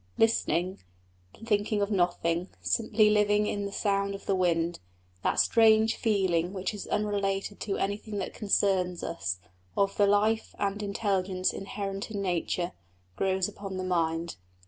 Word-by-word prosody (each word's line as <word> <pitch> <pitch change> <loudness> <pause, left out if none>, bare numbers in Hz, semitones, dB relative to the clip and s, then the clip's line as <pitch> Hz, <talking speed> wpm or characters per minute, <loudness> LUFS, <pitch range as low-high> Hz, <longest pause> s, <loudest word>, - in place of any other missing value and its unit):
Listening, 190 -5 +1 0.7
thinking 210 -1 +1
of 200 +1 0
nothing, 175 -2 +1
simply 215 -1 +2
living 210 0 +3
in 205 -1 -2
the - - -7
sound 200 -1 0
of 195 - -10
the - - +1
wind, 170 -2 +1 0.4
that - - +1
strange 220 -1 +5
feeling 190 -5 +1
which 190 +1 -3
is 205 - -6
unrelated 200 -1 -1
to 200 -2 -2
anything 205 +1 -3
that 195 - -3
concerns 190 -4 +1
us, 100 - -2 0.4
of 200 0 +2
the 205 - +5
life 215 +2 +2
and 200 +1 -1
intelligence 195 -3 0
inherent 195 0 -4
in 210 -2 -4
nature, 180 -1 -1 0.4
grows 190 - +1
upon 200 -2 -7
the 185 - -3
mind. 165 -2 -1
195 Hz, 145 wpm, -29 LUFS, 185-210 Hz, 0.7 s, strange